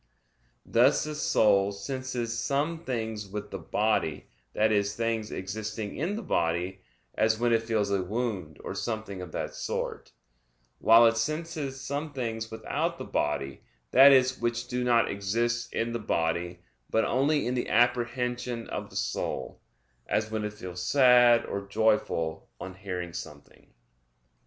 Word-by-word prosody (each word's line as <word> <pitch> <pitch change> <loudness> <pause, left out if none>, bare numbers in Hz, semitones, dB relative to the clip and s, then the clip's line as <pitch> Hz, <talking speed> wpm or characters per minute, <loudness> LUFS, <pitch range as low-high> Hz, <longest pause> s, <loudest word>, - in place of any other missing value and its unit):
Thus 125 +5 +4
the 155 - -4
soul 100 -9 +3
senses 120 +2 -4
some 155 +6 -1
things 110 -4 -3
with 105 +1 -6
the 95 - -5
body, 105 -3 0 0.3
that 110 +1 +3
is, 100 0 +1
things 115 -2 -1
existing 105 +2 -5
in 175 +8 -2
the 225 - -5
body, 90 - -1 0.3
as 110 0 +2
when 120 +1 +2
it 115 - +3
feels 110 -3 0
a 100 -1 +2
wound 95 -6 -3
or - - -4
something 110 -5 -4
of 90 -3 -8
that - - -3
sort; - - -4 0.7
while 115 +1 +7
it 115 0 +4
senses 155 +1 -3
some 145 +3 -4
things 115 -4 -3
without 110 0 -2
the - - -6
body, 70 -2 -2 0.3
that 135 +2 +9
is, 130 -1 +4
which 120 0 -1
do 125 0 -2
not 120 -1 +3
exist 120 +4 -1
in 115 +1 -1
the 120 - -2
body, 85 -3 -1 0.3
but 110 - +2
only 145 +4 +2
in 125 - 0
the 125 - -2
apprehension 120 0 0
of - - -4
the - - -15
soul, - - -3 0.5
as 110 0 0
when 110 -1 -2
it 105 0 -3
feels 90 -4 -7
sad 120 +1 +5
or 100 0 -5
joyful 100 -7 0
on 95 - -7
hearing 90 -3 -5
something. - - -10
115 Hz, 150 wpm, -28 LUFS, 100-125 Hz, 0.7 s, that